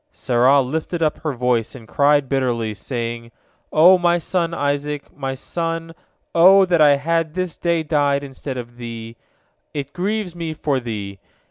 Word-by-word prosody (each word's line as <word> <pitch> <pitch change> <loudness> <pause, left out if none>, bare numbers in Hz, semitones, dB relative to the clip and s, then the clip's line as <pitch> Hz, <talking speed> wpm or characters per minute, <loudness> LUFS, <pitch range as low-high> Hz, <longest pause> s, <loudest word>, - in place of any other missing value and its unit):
Sarah 130 +2 +3
lifted 160 +5 -3
up 155 - 0
her 155 -3 -3
voice, 125 0 0
and 115 -4 -12
cried 145 +1 +3
bitterly, 120 -5 -1
saying: 115 +1 -5 0.4
"O 180 +4 +6
my 175 0 +3
son, 170 0 -1
Isaac, 145 -1 -3
my 135 -2 -4
son, 165 +3 -4 0.4
O 190 +3 +7
that 175 -3 +2
I 145 -2 +7
had 165 +2 -1
this 185 -3 -2
day 170 -2 +1
died 145 -2 +1
instead 135 -1 -6
of 120 -1 -8
thee 115 -1 -8
I - - -18
It 140 0 -5
grieves 190 0 -2
me 165 -2 -4
for 145 -3 -1
thee! 105 -5 -6
145 Hz, 160 wpm, -20 LUFS, 125-165 Hz, 0.4 s, O